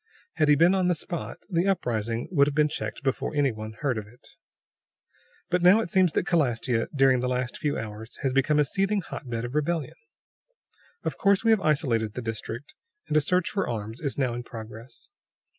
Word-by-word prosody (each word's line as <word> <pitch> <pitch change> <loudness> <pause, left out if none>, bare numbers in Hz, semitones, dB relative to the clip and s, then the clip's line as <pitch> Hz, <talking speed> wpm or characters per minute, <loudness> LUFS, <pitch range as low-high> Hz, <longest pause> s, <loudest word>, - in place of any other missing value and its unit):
Had 155 - +3
he 150 - +7
been 170 +5 +5
on 185 -2 +2
the 180 - +2
spot, 170 0 -5
the 180 -1 +1
uprising 115 - -1
would 140 -5 +4
have 145 - -2
been 150 0 +4
checked - - -5
before 135 +2 -1
any 145 -2 +3
one 110 0 -7
heard 130 -6 0
of 105 - -9
it. 120 +3 -19 1.2
"But 180 -1 +2
it - - +1
now 210 +5 +6
seems 180 -2 +2
that - - 0
Calastia, 120 -7 +1
during 135 -2 +4
the 125 +1 -1
last 125 -1 -2
few 145 -1 -1
hours, 110 +1 -7
has 135 -2 +1
become 135 +3 +2
a 150 - +4
seething 195 +6 0
hotbed 120 -8 -5
of 120 - -6
rebellion. 150 +1 -1 1.1
Of - - -3
course, 200 0 +3
we 225 - +4
have 220 -3 +4
isolated 120 - +1
the 125 - -4
district, 115 +3 -6 0.4
and - - 0
a 155 - +5
search 180 +4 +1
for 195 -8 -1
arms 110 0 -4
is 140 -4 -2
now 130 -4 0
in 120 - -4
progress. 115 - -11
140 Hz, 200 wpm, -26 LUFS, 120-170 Hz, 1.2 s, he